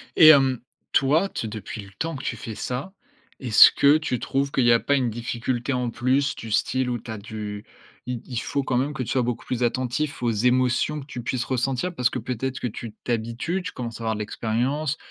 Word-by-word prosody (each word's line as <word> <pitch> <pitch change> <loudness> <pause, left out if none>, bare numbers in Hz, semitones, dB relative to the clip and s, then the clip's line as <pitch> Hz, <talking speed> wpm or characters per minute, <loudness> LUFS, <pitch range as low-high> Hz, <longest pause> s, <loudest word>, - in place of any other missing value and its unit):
Et 160 - +8
hem, 135 -4 +6 0.3
toi, 150 +8 +3
t 115 - -4
depuis 105 0 -6
le 100 - -12
temps 165 -1 -2
que 135 - -7
tu - - -3
fais 115 - -6
ça, 130 - -4 0.5
est-ce 115 -5 +8
que 145 +2 +5
tu 140 -6 -2
trouves 135 +1 -1
qu'il 130 - +2
y 120 - +6
a 115 - +5
pas 140 - 0
une 130 -3 +1
difficulté 120 +3 -2
en 125 -1 -1
plus? 130 +5 +1
Du 110 - -8
style 130 +4 +1
où 120 - -2
tu 115 - -13
as 110 - -5
du 105 -1 -7 0.4
i 125 -2 -4
il 125 -3 -6
faut 140 +4 -1
quand 130 - -1
même 140 +4 0
que - - -4
tu 120 - -4
sois 130 - +2
beaucoup 120 -1 -3
plus 125 -1 -2
attentif 130 +4 -1
aux 120 - +1
émotions 125 +6 +2
que 135 - -9
tu 130 -4 -7
puisses 125 +1 -2
ressentir, 135 +7 -1
parce 125 -5 +2
que 130 - -4
peut-être 125 +2 -3
que - - -2
tu 115 -1 -7
t'habitues, 120 +10 -2
tu 200 - -5
commences 115 -2 -6
à - - -5
avoir 110 -1 0
de - - -6
l'expérience. 125 +8 -1
125 Hz, 230 wpm, -24 LUFS, 115-135 Hz, 0.5 s, Et